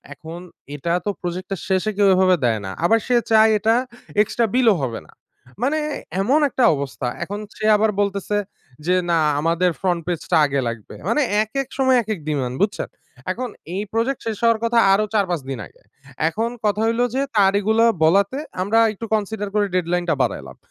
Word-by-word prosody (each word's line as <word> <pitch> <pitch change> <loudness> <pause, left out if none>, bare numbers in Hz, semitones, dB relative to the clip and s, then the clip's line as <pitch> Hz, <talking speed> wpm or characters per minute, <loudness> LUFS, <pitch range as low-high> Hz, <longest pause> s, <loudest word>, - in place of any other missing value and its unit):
এখন 165 +4 -9 0.3
এটা 170 +4 -2
তো - - +2
প্রজেক্টটা 185 +2 -4
শেষে 190 +2 +1
কেউ 205 -1 +4
এভাবে 185 0 +4
দেয় 115 -3 +1
না। 95 - -5
আবার 225 +5 +4
সে 250 - +1 0.2
চায় 220 0 +6
এটা 220 +2 +2 0.5
এক্সট্রা 230 +2 0
বিলও 245 -4 +5
হবে 120 -4 -3
না। - - -21 0.5
মানে 295 +4 +1 0.4
এমন 270 +10 +3
একটা 255 -1 0
অবস্থা! 140 -2 -4 0.2
এখন 205 +2 -6 0.2
সে 215 - -6
আবার 215 +1 +2
বলতেছে 200 0 -1 0.5
যে 180 - +3 0.2
না 170 - +3 0.2
আমাদের 170 +3 +2
ফ্রন্ট 180 -3 0
পেজটা 175 -3 -1
আগে 140 -1 -1
লাগবে। 115 -3 -7
মানে 265 +7 +2 0.2
একেক 265 +5 -4
সময় 260 -1 +4
একেক 215 -2 -4
ডিমান্ড, 130 -4 -2
বুঝছেন? 205 0 -1 0.4
এখন 250 +5 -4 0.3
এই 195 - -2
প্রজেক্ট 235 +4 0
শেষ 220 - -2
হওয়ার 230 -1 +4
কথা 230 0 +2
আরো 210 +2 +3
৪-৫ 180 -6 +1
দিন 135 - -4
আগে। - - -21 0.5
এখন 225 +7 -2
কথা 210 0 +1
হইলো 230 +2 +1
যে, 265 - +1 0.2
তার 195 -2 +5
এগুলা 220 +3 +2 0.2
বলাতে 200 - +3 0.2
আমরা 210 +4 +2
একটু 225 +2 -7
কনসিডার 210 -1 -2
করে 210 -1 +2
ডেডলাইনটা 175 -1 0
বাড়াইলাম। - - -4
205 Hz, 175 wpm, -21 LUFS, 175-225 Hz, 0.5 s, চায়